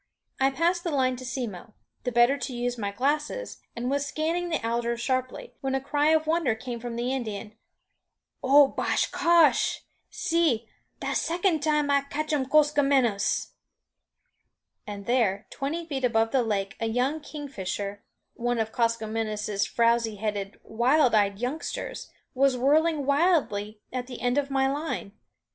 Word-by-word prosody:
I 270 0 +4
passed 340 +5 0
the 345 - -1
line 260 -4 +1
to 255 - -9
Simmo, 225 -5 -5 0.3
the 250 - 0
better 240 +3 +4
to 275 -2 -5
use 245 0 -1
my 205 -4 -3
glasses, 295 - -2
and 240 +1 -3
was 280 +2 0
scanning 330 +4 -2
the 320 -9 -1
alders 235 0 -1
sharply, 255 +1 -2
when 270 0 -1
a - - +1
cry 290 +2 0
of 315 0 +3
wonder 315 -7 +1
came 240 +1 -6
from 235 0 -5
the 245 +2 -1
Indian. 215 -4 -5 0.9
"O 280 +2 +6
bah - - -1 0.2
cosh, 335 -2 +3 0.3
see! 325 -10 +1 0.3
das - - 0
second 345 -2 +1
time 300 -2 +1
I 280 0 +4
catchum, 290 -1 -2
Koskomenos." 275 -7 +2 1.4
And 200 -1 -7
there, 220 -5 +1
twenty 320 +5 -3
feet 275 -5 -4
above 225 -2 +2
the 265 - +3
lake, 200 -4 -2
a 225 - -1
young 250 +7 0
kingfisher 205 - -5 0.3
one 240 0 -1
of 220 -1 -1
Koskomenos' 220 -3 -1
frowzy 230 -1 +2
headed, 205 -1 -4
wild 250 +3 +3
eyed 200 -2 +3
youngsters 255 +8 -4 0.2
was 270 0 +3
whirling 300 +3 +2
wildly 275 - +1
at 250 -1 -3
the 250 -2 -8
end 245 +3 +1
of 280 -1 -3
my 270 -1 +2
line. 285 -7 -3
255 Hz, 150 wpm, -27 LUFS, 225-290 Hz, 1.4 s, O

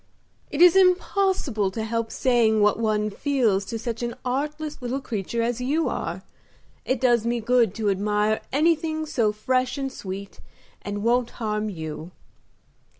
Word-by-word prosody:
"It 300 +4 +3
is 355 0 +7
impossible 365 - +2
to 220 +3 -4
help 225 0 -2
saying 235 -4 +2
what 210 +1 +3
one 215 -1 0
feels 225 -6 +1
to 230 - -4
such 230 0 -4
an 235 0 -3
artless 295 +3 -3
little 250 +2 -2
creature 230 -2 -3
as 240 +1 -1
you 295 +6 +1
are. - - -4 0.6
It 260 -1 0
does 240 -3 +3
me 235 +1 0
good 230 -3 +2
to 220 -2 -2
admire 210 +2 0
anything 315 +1 +1
so 240 -9 +1
fresh 255 +5 0
and 270 -1 -3
sweet, 195 -4 -7 0.4
and 205 0 -4
won't 240 +1 +2
harm 215 -2 -2
you." 160 -2 -6
235 Hz, 150 wpm, -24 LUFS, 210-270 Hz, 0.6 s, is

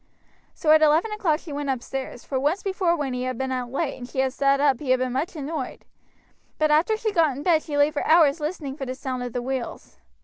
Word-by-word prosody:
So 310 - +2
at 310 0 +7
eleven 315 +8 +4
o'clock 355 -8 0
she 310 - -8
went 285 0 -3
upstairs, 260 -1 -4
for 265 - -2
once 300 +8 0
before 375 -3 +1
when 285 -5 -3
he 250 - -3
had 255 -2 -3
been 265 +1 -2
out 250 -2 -3
late 280 0 -2
and 245 0 -8
she - - -11
had 265 -1 +1
sat 275 0 +2
up 275 -3 +3
he 290 - -6
had 255 0 +4
been 255 -1 -1
much 290 +7 -2
annoyed; 295 -2 -5 0.7
but 310 -1 +2
after 330 +9 +3
she 435 0 -1
got 320 -8 +2
in 285 - -6
bed 325 -2 +3
she 295 -2 -4
lay 290 +1 +4
for 295 - -2
hours 315 -2 +5
listening 300 -3 -4
for 275 -3 -6
the 255 - -4
sound 255 -1 -4
of 245 0 -4
the 245 - -2
wheels. 255 - -5
285 Hz, 250 wpm, -24 LUFS, 260-315 Hz, 0.7 s, at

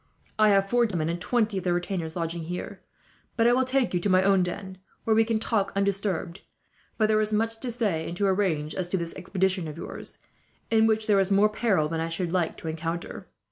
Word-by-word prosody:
I 215 0 +6
have 195 -1 +3
four 240 +2 +3
gentlemen 165 -6 -2
and 170 +1 -3
twenty 220 -4 +1
of - - -9
their 175 -1 +1
retainers 175 -3 -3
lodging 165 -1 -3
here; 180 +2 -6 0.6
but 230 - +3
I 240 - +5
will 260 +1 +3
take 260 -3 +1
you 175 - +2
to 200 - -1
my 185 0 +4
own 195 -1 +4
den, 185 +1 -4 0.2
where 220 - +2
we 225 - +5
can 225 0 0
talk 215 -2 0
undisturbed; 195 -2 -1 0.6
for 220 - +3
there 215 0 +3
is 215 0 -1
much 225 +1 0
to 255 - -4
say 205 -9 -1
and 170 - -5
to 200 - +1
arrange, 185 -6 0
as 180 -2 -3
to 190 - 0
this 170 -1 -4
expedition 185 -1 -1
of 155 +1 -7
yours, - - -7 0.5
in 225 0 +5
which 220 0 +1
there 205 -2 +4
is 190 -1 +2
more 200 +2 +4
peril 210 -8 +1
than 165 +1 -3
I 165 - -2
should 170 +1 -2
like 175 -3 0
to - - -8
encounter. 165 +2 -4
195 Hz, 230 wpm, -26 LUFS, 170-215 Hz, 0.6 s, I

